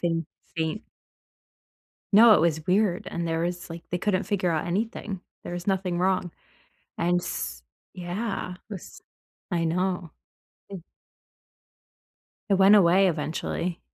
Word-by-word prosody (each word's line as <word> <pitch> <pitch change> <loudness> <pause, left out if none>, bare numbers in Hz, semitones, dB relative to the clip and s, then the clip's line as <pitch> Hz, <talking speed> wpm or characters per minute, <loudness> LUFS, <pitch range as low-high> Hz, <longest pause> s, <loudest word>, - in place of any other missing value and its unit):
Faint 165 -2 0 0.3
faint. 160 +7 -2 1.3
No, 220 +1 +9
it - - +4
was 160 -2 +1
weird, 185 -1 +2
and 170 0 -3
there 165 0 -1
was 175 0 -3
like, 165 0 -7
they 180 - 0
couldn't 195 0 0
figure 190 -4 0
out 160 -2 -1
anything. 200 +1 -3 0.2
There - - -6
was 175 0 -6
nothing 185 -3 0
wrong. 185 -1 +1 0.7
And, 175 +1 +2
s 60 - -4 0.3
yeah. 180 +2 -4
It 180 - -16
was 185 - -10 0.5
I 170 -2 +1
know. 180 0 -1 0.6
It 190 -4 -8 1.7
it - - +5
went 195 +2 +7
away 190 0 +6
eventually. 165 +2 -3
180 Hz, 135 wpm, -26 LUFS, 170-195 Hz, 1.7 s, No